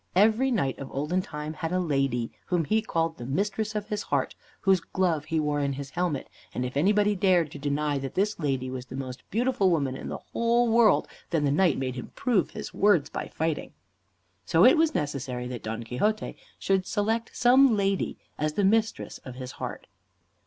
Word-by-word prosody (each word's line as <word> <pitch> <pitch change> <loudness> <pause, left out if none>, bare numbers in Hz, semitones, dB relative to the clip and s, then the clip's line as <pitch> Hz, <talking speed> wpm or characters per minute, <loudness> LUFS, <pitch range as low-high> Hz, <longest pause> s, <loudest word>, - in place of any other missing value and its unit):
Every 220 +7 +4
knight 140 - 0
of 135 - -6
olden 150 +7 0
time 150 -3 -6
had 165 0 -4
a 185 - +1
lady, 135 -8 0 0.2
whom 175 -3 +1
he 220 +7 +2
called 165 -6 -1
the 120 - -6
Mistress 210 +8 -1
of 210 -1 -3
his 210 - -2
Heart, - - -1 0.3
whose 190 -2 +4
glove 170 -4 -1
he 160 0 0
wore 150 -1 0
in 140 -1 0
his 140 0 -7
helmet; 175 -6 -1 0.3
and 125 - -1
if 125 - -5
anybody 205 +6 +3
dared 180 -5 +3
to 145 - -8
deny 145 0 0
that 135 0 -6
this 205 +1 0
lady 135 -4 -1
was 130 -1 -6
the 130 - -8
most 130 -1 -6
beautiful 230 -3 +2
woman 140 -6 0
in - - -6
the - - -4 0.2
whole 235 +1 +3
world, 230 0 +4 0.2
then 165 -3 +1
the 140 - +2
knight 170 0 +3
made 130 -1 -2
him 125 - -7
prove 235 -9 +1
his - - -7
words 180 -8 +3
by - - -4
fighting. 160 -1 -3 0.7
So - - +4
it - - +8
was 320 -1 +2
necessary 130 -4 -2
that 125 -2 -5
Don 110 +1 -4
Quixote 205 - -1 0.2
should 190 -1 0
select 225 +2 -1
some 250 -1 +5
lady 195 -1 0 0.2
as 155 0 0
the 205 - 0
Mistress 220 +2 +1
of 130 -2 -10
his 130 0 -7
Heart. - - -6
165 Hz, 200 wpm, -27 LUFS, 140-210 Hz, 0.7 s, it